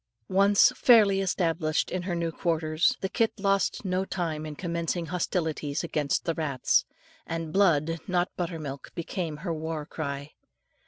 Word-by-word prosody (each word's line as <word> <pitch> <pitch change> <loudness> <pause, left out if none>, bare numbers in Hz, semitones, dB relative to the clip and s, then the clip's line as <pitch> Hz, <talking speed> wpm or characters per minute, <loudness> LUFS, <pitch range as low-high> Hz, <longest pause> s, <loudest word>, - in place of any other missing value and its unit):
Once 200 +1 +6
fairly 210 -6 +5
established 165 -4 0
in 185 - -1
her 180 -1 -3
new 170 -1 -1
quarters, 165 +7 +1
the 190 - 0
kit 225 +3 +1
lost 195 +1 +1
no 185 0 0
time 160 -5 -3
in 150 - -7
commencing 170 0 -2
hostilities 160 -3 -2
against 150 -4 -1
the 165 - +1
rats, 145 -6 +1 0.4
and 165 -1 -4
blood, 165 -4 +3
not 180 -1 0
butter 175 -1 -3
milk, 140 -3 -7
became 170 -2 -3
her 170 - -1
war 160 -1 -4
cry. 145 -2 -5
165 Hz, 150 wpm, -27 LUFS, 155-185 Hz, 0.4 s, Once